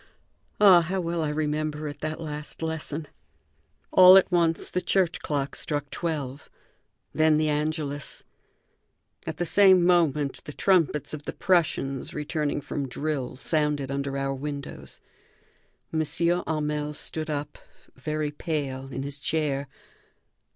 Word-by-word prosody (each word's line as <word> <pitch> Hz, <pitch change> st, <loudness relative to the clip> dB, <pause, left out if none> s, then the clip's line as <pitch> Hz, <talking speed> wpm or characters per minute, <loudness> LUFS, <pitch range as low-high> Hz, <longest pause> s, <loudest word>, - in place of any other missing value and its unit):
Ah, 190 Hz, -4 st, +8 dB
how 185 Hz, +4 st, -2 dB
well 170 Hz, -2 st, -1 dB
I 155 Hz, -, 0 dB
remember 150 Hz, 0 st, -2 dB
it, 145 Hz, -, -7 dB
that 155 Hz, 0 st, -4 dB
last 150 Hz, 0 st, -6 dB
lesson! 160 Hz, -1 st, -4 dB, 0.8 s
All 185 Hz, 0 st, +9 dB
at 190 Hz, -, +3 dB
once 170 Hz, -2 st, +1 dB
the 180 Hz, -, 0 dB
church 180 Hz, -3 st, +1 dB
clock 140 Hz, -2 st, -2 dB
struck 145 Hz, -3 st, -2 dB
twelve. 145 Hz, -5 st, -4 dB, 0.6 s
Then 155 Hz, -1 st, +4 dB
the 155 Hz, 0 st, +1 dB
Angelus. 150 Hz, -1 st, -2 dB, 1.0 s
At -, -, -4 dB
the 175 Hz, -, -1 dB
same 185 Hz, 0 st, +6 dB
moment 150 Hz, -6 st, +2 dB
the 150 Hz, -, -7 dB
trumpets 165 Hz, -7 st, +1 dB
of 150 Hz, -1 st, -7 dB
the -, -, -4 dB
Prussians, 150 Hz, -7 st, 0 dB
returning 150 Hz, -1 st, -2 dB
from 140 Hz, 0 st, -4 dB
drill, 135 Hz, -1 st, -3 dB
sounded 150 Hz, -1 st, 0 dB
under 140 Hz, 0 st, -2 dB
our 135 Hz, 0 st, -1 dB
windows. 140 Hz, +1 st, -7 dB, 0.9 s
M. 160 Hz, -, +1 dB
Hamel 155 Hz, -2 st, 0 dB
stood 155 Hz, +1 st, -3 dB
up, 145 Hz, 0 st, -4 dB, 0.4 s
very 150 Hz, +2 st, -2 dB
pale, 145 Hz, -4 st, -3 dB
in 135 Hz, -, -4 dB
his 140 Hz, 0 st, -5 dB
chair. 140 Hz, -2 st, -1 dB
150 Hz, 130 wpm, -26 LUFS, 145-165 Hz, 1.0 s, All